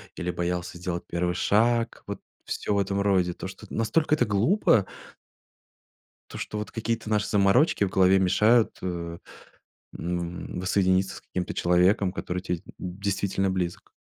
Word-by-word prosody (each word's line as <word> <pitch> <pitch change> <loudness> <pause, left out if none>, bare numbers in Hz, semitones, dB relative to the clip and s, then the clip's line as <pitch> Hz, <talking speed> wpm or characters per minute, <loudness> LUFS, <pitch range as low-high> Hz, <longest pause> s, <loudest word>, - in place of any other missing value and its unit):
или 90 -1 -2
боялся 90 0 -3
сделать 90 -1 -3
1 90 0 -1
шаг 115 +5 +1
вот - - -5 0.3
всё 105 - -2
в 100 - +2
этом 100 +1 0
роде, 95 -3 +2
то - - -7
что, 95 - -12
настолько 150 +8 +1
это 125 - +2
глупо. 115 - +3 1.5
То - - -7
что 105 - -4
вот 105 - -5
какие-то 115 -1 -3
наши 105 -1 +1
заморочки 105 +4 +3
в 95 - -2
голове 95 0 +5
мешают, 105 +5 +3
э, 85 -2 -4 0.8
м, 85 +1 -4
воссоединиться 95 0 +1
с - - -12
каким-то 90 -1 -4
человеком, 90 +2 +3
который 90 -1 -4
тебе 90 -1 -2
д - - -25
действительно 95 +1 -1
близок. 90 -2 -3
95 Hz, 150 wpm, -26 LUFS, 90-105 Hz, 1.5 s, голове